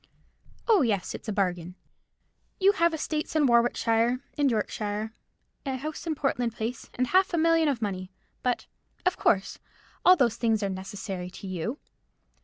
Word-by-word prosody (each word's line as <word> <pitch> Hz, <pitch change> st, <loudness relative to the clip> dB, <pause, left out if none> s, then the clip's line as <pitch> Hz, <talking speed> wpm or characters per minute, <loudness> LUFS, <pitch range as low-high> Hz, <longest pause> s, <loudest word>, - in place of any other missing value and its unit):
"Oh, 440 Hz, -6 st, +5 dB
yes, 210 Hz, -8 st, 0 dB
it's -, -, -8 dB
a -, -, -1 dB
bargain. 180 Hz, -3 st, -1 dB, 0.8 s
You 390 Hz, +1 st, +6 dB
have 340 Hz, -3 st, +2 dB
estates 315 Hz, -1 st, -3 dB
in 305 Hz, -2 st, +4 dB
Warwickshire 235 Hz, 0 st, +3 dB
and 290 Hz, -2 st, +3 dB
Yorkshire, 215 Hz, -1 st, -2 dB, 0.5 s
a 270 Hz, -2 st, -2 dB
house 305 Hz, +5 st, -6 dB
in 315 Hz, -, 0 dB
Portland 245 Hz, -5 st, -1 dB
Place, 230 Hz, +1 st, -4 dB
and 255 Hz, -, +1 dB
half 370 Hz, +5 st, +3 dB
a -, -, 0 dB
million 330 Hz, 0 st, +4 dB
of 255 Hz, -6 st, 0 dB
money; 185 Hz, -2 st, -3 dB, 0.3 s
but, 250 Hz, -1 st, 0 dB, 0.4 s
of 365 Hz, -, +3 dB
course, 195 Hz, -2 st, +1 dB, 0.4 s
all 365 Hz, -, +8 dB
those 240 Hz, -9 st, +2 dB
things 225 Hz, -3 st, +1 dB
are 200 Hz, -, 0 dB
necessary 190 Hz, -1 st, -5 dB
to 190 Hz, -, -10 dB
you. 190 Hz, -, -3 dB
235 Hz, 160 wpm, -27 LUFS, 205-300 Hz, 0.8 s, all